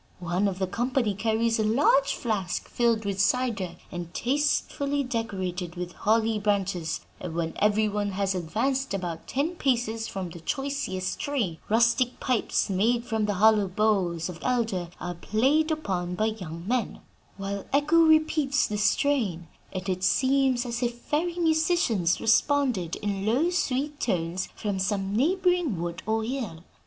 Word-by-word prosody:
One 180 +3 0
of 190 -2 -2
the 190 - 0
company 235 +2 0
carries 225 +3 +1
a - - +2
large 270 +5 +3
flask 200 -7 -2
filled 230 -3 +1
with 195 -1 0
cider 225 -10 0 0.2
and 175 -1 -6
tastefully 285 +1 0
decorated 190 -8 -3
with 180 0 -5
holly 220 +2 +1
branches; 195 -6 -1 0.2
and 175 -3 -6
when 165 -1 -1
every 210 +1 +3
one 205 -1 -2
has 195 0 0
advanced 225 +8 -1
about 175 -4 -5
ten 315 +6 -1
paces 235 -5 0
from 185 -3 -5
the 170 - -9
choicest 230 - -3
tree, 245 - -2
rustic 235 +3 +3
pipes 250 -4 0
made 230 +5 +1
from 220 -3 0
the 205 - 0
hollow 210 0 +4
boughs 185 -4 +1
of 175 -2 -8
elder 225 -8 0
are 175 0 -4
played 265 - +1
upon 185 - -2
by 215 - +1
young 180 -6 -5
men, 245 -2 -1 0.4
while 195 0 -4
Echo 290 +4 +3
repeats 310 -3 +4
the 210 -1 -3
strain, 210 - +1 0.2
and 185 0 -5
it 185 -1 -2
seems 260 +2 +2
as 240 0 -3
if 240 -1 0
fairy 335 +7 -2
musicians 315 - +2
responded 235 - +2
in 200 -2 -2
low, 255 - +2
sweet 295 -3 -1
tones 180 -3 -1
from 200 -3 -2
some 195 0 -1
neighboring 355 - +2
wood 170 +1 -4
or 220 0 +1
hill. 220 -9 -4
220 Hz, 150 wpm, -27 LUFS, 185-265 Hz, 0.4 s, hollow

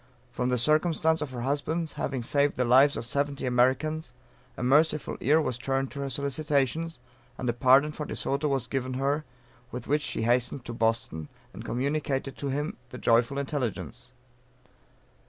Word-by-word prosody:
From 125 +1 -1
the 125 - +2
circumstance 160 +4 +2
of 150 - -3
her 125 -2 -6
husband's 150 +5 -1
having 130 -3 -3
saved 140 +4 +1
the 125 - +2
lives 135 +4 +5
of - - -4
seventy 140 +2 -1
Americans, 130 +4 +1 0.4
a - - -4
merciful 150 +4 +3
ear 150 +6 +4
was 130 -6 -1
turned 135 +1 -1
to 140 - -7
her 140 0 -2
solicitations, 140 +3 -1 0.4
and 125 - -4
a 120 - +2
pardon 130 +4 +5
for 150 -1 -6
De - - -5
Soto 140 +2 -1
was 135 -4 0
given 130 -1 -3
her, 140 +3 0 0.4
with 125 -1 -7
which 150 +2 +2
she 130 - -2
hastened 120 +2 +1
to 120 - -5
Boston, 115 -9 -1 0.3
and - - -8
communicated 135 +1 -1
to 140 - -3
him 145 +3 -2
the 125 - -8
joyful 120 +3 +2
intelligence. 125 -3 -3
135 Hz, 170 wpm, -28 LUFS, 125-150 Hz, 0.4 s, lives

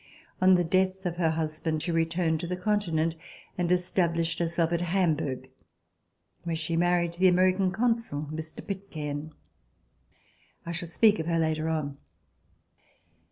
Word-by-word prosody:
On 185 0 +7
the 175 - +3
death 185 +2 +1
of 175 -1 -2
her 165 -2 +2
husband 155 0 -2
she 175 - -2
returned 165 0 +1
to 170 - -4
the 180 +1 -3
Continent 180 -5 0 0.4
and 175 -1 -1
established 170 -2 +1
herself 170 -1 +1
at 170 - 0
Hamburg, 155 -8 0 0.9
where 170 -1 -2
she 160 +1 -2
married 175 0 +2
the 185 +2 +4
American 185 +1 +3
consul, 225 -9 -1
Mr. 160 0 -7
Pitcairn. 155 -6 -5 1.3
I 170 - -4
shall 170 +1 -3
speak 210 +5 +4
of 160 - -3
her 165 -1 +1
later 160 0 0
on. 145 -3 -2
170 Hz, 140 wpm, -28 LUFS, 160-180 Hz, 1.3 s, On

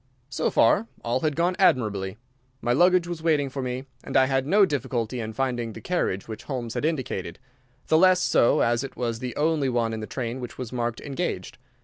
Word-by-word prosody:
So 135 - 0
far 195 - +3 0.2
all 120 +2 0
had 150 +1 0
gone 175 +3 +1
admirably. 105 - +2 0.4
My 120 -1 0
luggage 180 +4 +4
was 175 -2 -5
waiting 150 -4 +1
for 135 - -4
me, 130 +1 -4 0.2
and - - 0
I 130 - +6
had 135 0 0
no 200 +4 +5
difficulty 125 - -2
in 110 -1 -4
finding 120 -2 -2
the - - -8
carriage 170 - -1
which 110 -1 -8
Holmes 120 -5 -4
had - - -2
indicated, 130 - -2 0.5
the 160 - +4
less 185 0 +6
so 120 - +3
as 120 +2 +2
it 135 - -8
was 115 -2 -2
the 125 -1 -5
only 150 -3 +1
one 115 -2 0
in 110 - -3
the 110 - -6
train 120 -1 -4
which 125 -2 -7
was 125 -2 -6
marked 120 -1 -2
"Engaged." 140 -2 -4
130 Hz, 210 wpm, -25 LUFS, 115-155 Hz, 0.5 s, I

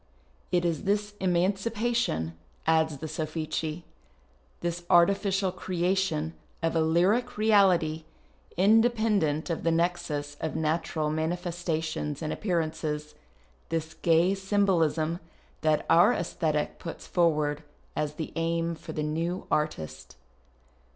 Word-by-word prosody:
It 175 -1 +2
is 165 -3 -1
this 205 +1 +1
emaneipation, 195 - 0 0.3
adds 160 -2 +2
the 140 - -7
Sofllei, 155 +1 -3 0.8
this 175 0 -2
artifieial 190 +1 +3
creation 180 -3 0 0.3
of 165 0 +1
a 165 - +3
lyric 190 +10 +2
reality 185 -7 +3 0.5
independent 210 -6 +3
of 165 - -2
the 165 - +1
nexus 165 -4 -1
of 160 - -3
natural 160 -1 0
manifestations 160 -2 -2
and 155 - -2
appearances, 155 -5 -2 0.6
this 160 -1 -2
gay 170 +3 +3
symbolism, 180 -5 +1 0.4
that 155 -1 +2
our 190 +9 +6
ffisthctie 155 -3 -1
jjuts 165 - -7
forward 150 -4 +1 0.3
as 150 0 -2
the 160 - -5
aim 165 0 0
for 160 - -8
the 150 - -2
new 165 +4 -2
artist. 80 - -2
165 Hz, 110 wpm, -28 LUFS, 155-185 Hz, 0.8 s, our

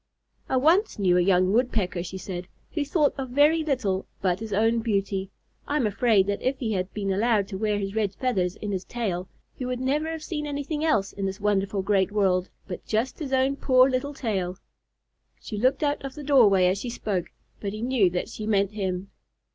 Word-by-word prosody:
"I 260 - +2
once 335 - +3
knew 185 -4 +3
a 180 - +4
young 185 +1 +3
Woodpecker," 215 -7 +1
she 190 +2 -6
said, 180 -1 -6 0.2
"who 305 - -1
thought 290 0 +2
of 260 -1 -3
very 295 +5 +4
little 235 -11 -1
but 185 -1 0
his 220 -1 -6
own 225 +3 +2
beauty. 195 -3 -1 0.4
I 290 - -1
am 260 - +1
afraid 210 -1 +3
that 200 0 -2
if 260 +1 0
he 230 -4 -2
had 185 -1 -2
been 200 -2 -2
allowed 210 0 +2
to 190 - -4
wear 210 -1 +1
his 195 -1 -3
red 205 -3 -1
feathers 190 -9 0
in 210 - -5
his 190 -2 -2
tail, 195 -6 -3 0.2
he - - -7
would 250 0 -2
never 285 +5 0
have 320 -1 -5
seen 300 -2 -4
anything 290 +2 -3
else 215 -12 +1
in 195 -1 -2
this 190 0 -5
wonderful 200 -1 0
great 195 -1 +2
world, 190 -3 +1 0.2
but 180 -3 -6
just 225 +8 -1
his 290 -4 -5
own 265 +1 +2
poor 255 -2 +5
little 275 +2 -2
tail." 190 -8 -2 0.8
She 210 - -6
looked 255 +6 +2
out 290 -1 0
of 275 -1 -6
the 300 - -7
doorway 220 -10 +5
as 185 +2 +2
she 245 - -4
spoke, 200 -6 -2 0.3
but 200 - -3
he 215 +2 -5
knew 245 -7 +3
that 180 0 -2
she 215 - -6
meant 200 -2 +2
him. 190 -2 -3
215 Hz, 210 wpm, -26 LUFS, 195-260 Hz, 0.8 s, poor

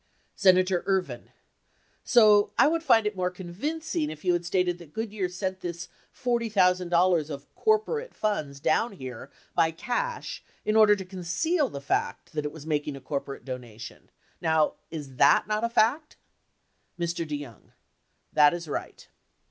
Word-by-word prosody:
Senator 185 -2 +4
Ervin. 190 -2 -1 0.7
So 210 -4 +5
I - - +6
would 330 +2 +1
find 235 -8 +4
it 210 -1 -1
more 180 -1 0
convincing 185 - -3
if 155 +3 -9
you 180 - +4
had 175 0 0
stated 175 0 0
that 160 -4 -14
Goodyear 215 -4 -3
sent 185 +1 -4
this 170 -1 -6 0.3
$40,000 180 - +2
of 140 -1 -8
corporate 440 +3 0
funds 155 -10 -2
down 165 +10 +1
here 130 -9 -8 0.2
by 160 - +3
cash 445 - -3 0.2
in 215 - +1
order 215 -1 +7
to 190 -2 -7
conceal 190 - -1
the 140 - -6
fact 140 - -2
that 150 -1 -2
it 150 - -2
was 155 -1 -11
making 150 -2 -1
a - - -8
corporate 140 +1 -5
donation. 125 -3 -9 0.3
Now, 160 -2 +2 0.2
is 145 -5 -8
that - - +5
not 215 +1 -1
a 235 - +1
fact? 245 +7 +1 0.8
Mr. 170 0 -1
DeYoung. 145 -7 -8 0.6
That 150 +2 +5
is 170 -1 -7
right. 145 - -6
180 Hz, 150 wpm, -27 LUFS, 155-215 Hz, 0.8 s, order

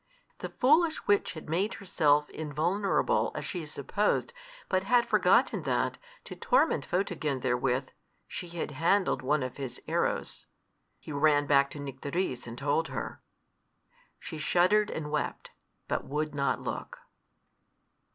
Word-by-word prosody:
The - - -5
foolish 310 +5 +3
witch 205 0 +2
had 155 -2 -9
made 185 +8 0
herself 150 -6 +2
invulnerable, 165 +7 0
as - - -4
she 170 -4 -5
supposed, 205 - -1 0.3
but 185 -1 +1
had 240 +2 +3
forgotten - - +3
that, - - -1 0.2
to - - -9
torment 325 - +2
Photogen 165 -7 -1
therewith, 125 +1 0 0.4
she 175 - -6
had 170 -2 -4
handled 165 +1 +2
one 140 +2 +1
of 130 -1 -5
his 135 -3 -6
arrows. - - -1 0.5
He - - -10
ran 145 0 +3
back 140 -1 +4
to 145 - -9
Nycteris 140 0 -3
and 115 +1 -7
told 145 +4 0
her. 135 - -5 1.0
She 160 - -7
shuddered 185 +7 +3
and 150 -2 -4
wept, 150 - -3 0.4
but - - -1
would 150 +1 -2
not 140 -1 0
look. - - -5
155 Hz, 135 wpm, -29 LUFS, 140-185 Hz, 1.0 s, back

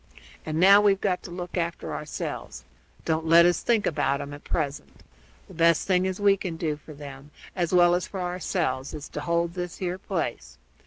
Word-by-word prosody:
And 155 0 -1
now 195 +3 +8
we've 200 -2 +3
got 185 -3 0
to - - -10
look 175 0 -6
after 170 0 -3
ourselves; 60 - -6 0.4
don't 160 0 0
let 170 +1 +7
us 175 0 +2
think 230 -3 +1
about 140 -3 0
'em 145 - -6
at 145 - -10
present. 145 -3 -4 0.5
The - - -13
best 165 0 +3
thing 185 -1 +2
as 185 +1 -3
we 200 -1 +4
can 180 -4 -5
do 155 -2 -1
for 150 +1 -13
them, 140 -1 -10 0.3
as 175 -3 -1
well 175 -1 +5
as 175 +1 0
for 195 - -6
ourselves, 175 -7 -2
is 150 - -7
to 150 - -5
hold 170 +1 0
this 180 -1 -5
here 185 0 -3
place. 140 - -4
170 Hz, 200 wpm, -26 LUFS, 150-185 Hz, 0.5 s, now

